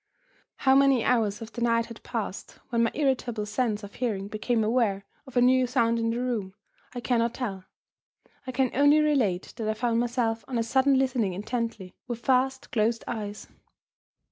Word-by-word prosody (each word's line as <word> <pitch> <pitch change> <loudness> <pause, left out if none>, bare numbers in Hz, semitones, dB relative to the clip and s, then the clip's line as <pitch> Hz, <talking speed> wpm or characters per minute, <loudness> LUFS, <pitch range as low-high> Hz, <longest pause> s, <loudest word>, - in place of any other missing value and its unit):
How 265 - +3
many 270 -3 +4
hours 225 -3 +1
of 225 - -10
the 240 - -6
night 230 -1 +2
had 230 -1 -11
passed, 220 -5 -5
when 235 -1 +1
my 230 - +2
irritable 250 -7 0
sense 210 0 -1
of 205 - -9
hearing 210 -6 -2
became 220 +2 0
aware 215 -4 +1 0.2
of 260 -2 -6
a - - +5
new 255 0 +4
sound 235 -2 +1
in 230 0 0
the 230 - -1
room, 225 -7 -2 0.4
I 245 - -4
cannot 235 0 +1
tell. 195 -7 -4 0.8
I - - -2
can 255 -1 +1
only 285 +3 +5
relate 255 -12 +1
that 220 -2 -2
I 215 - 0
found 230 0 0
myself 235 -2 0
on 255 - -2
a 230 - +1
sudden 265 +3 +3
listening 245 -7 +1
intently, 215 -1 -4
with 240 -1 -6
fast 265 +1 +1
closed 230 +1 +1
eyes. 210 -2 -5
235 Hz, 180 wpm, -27 LUFS, 215-255 Hz, 0.8 s, a